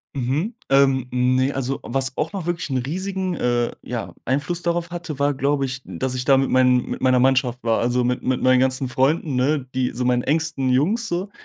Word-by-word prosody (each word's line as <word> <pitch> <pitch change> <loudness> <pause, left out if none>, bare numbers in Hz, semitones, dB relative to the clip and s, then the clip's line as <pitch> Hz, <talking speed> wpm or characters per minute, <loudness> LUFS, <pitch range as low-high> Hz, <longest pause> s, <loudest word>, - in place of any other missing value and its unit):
Mhm. 140 - -1 0.2
Ähm, 135 -2 +3
ne, 130 +2 +2
also 135 0 -2
was 135 +1 -1
auch 160 +5 -2
noch 185 -4 -4
wirklich 175 -4 -3
'n 130 - 0
riesigen, 185 +6 -3
äh 120 -2 0
ja, - - -5
Einfluss 145 +7 -1
darauf 170 0 -1
hatte, 170 -5 -6
war 145 0 +2
glaube 140 +1 0
ich, 130 +1 -5
dass 125 +9 -3
ich 125 - -3
da 135 -1 +5
mit 135 - +1
meinen 125 -1 +3
mit - - -4
meiner 130 -1 +3
Mannschaft 130 -1 +2
war, 115 -1 +1
also 125 +1 +1
mit 125 +1 -1
mit 130 0 0
meinen 130 0 +4
ganzen 130 0 +1
Freunden, 135 +2 +1
ne, 130 +1 +1
die 130 -1 0
so 125 +1 -3
meinen 125 -1 +2
engsten 155 -3 0
Jungs 195 - +1
so 185 +2 -3
135 Hz, 210 wpm, -22 LUFS, 125-155 Hz, 0.2 s, da